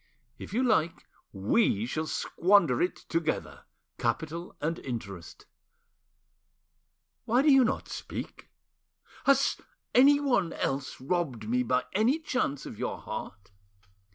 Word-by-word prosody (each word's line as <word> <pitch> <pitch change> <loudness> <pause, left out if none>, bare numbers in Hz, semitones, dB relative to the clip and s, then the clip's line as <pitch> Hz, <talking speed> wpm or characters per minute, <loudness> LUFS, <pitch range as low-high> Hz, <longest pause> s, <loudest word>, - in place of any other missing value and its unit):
If - - -8
you 245 +5 +1
like, 175 -9 +1 0.3
we 105 - +1
shall 155 +6 -3
squander 170 -10 +2
it 180 - +1
together, 165 -1 -2 0.3
capital 160 +8 -2
and 165 +3 -2
interest. 100 -9 -7 1.8
Why 245 +4 +3
do 300 - +6
you 270 -1 +7
not 225 - -1
speak? - - -7 0.8
Has 275 0 +3 0.3
anyone 275 -8 +4
else 135 0 -3
robbed 135 -7 -2
me 125 +2 +1
by 125 +1 +1
any 225 +9 +3
chance 255 - -2
of - - -9
your - - -2
heart? 100 -1 -8
165 Hz, 115 wpm, -29 LUFS, -, 1.8 s, you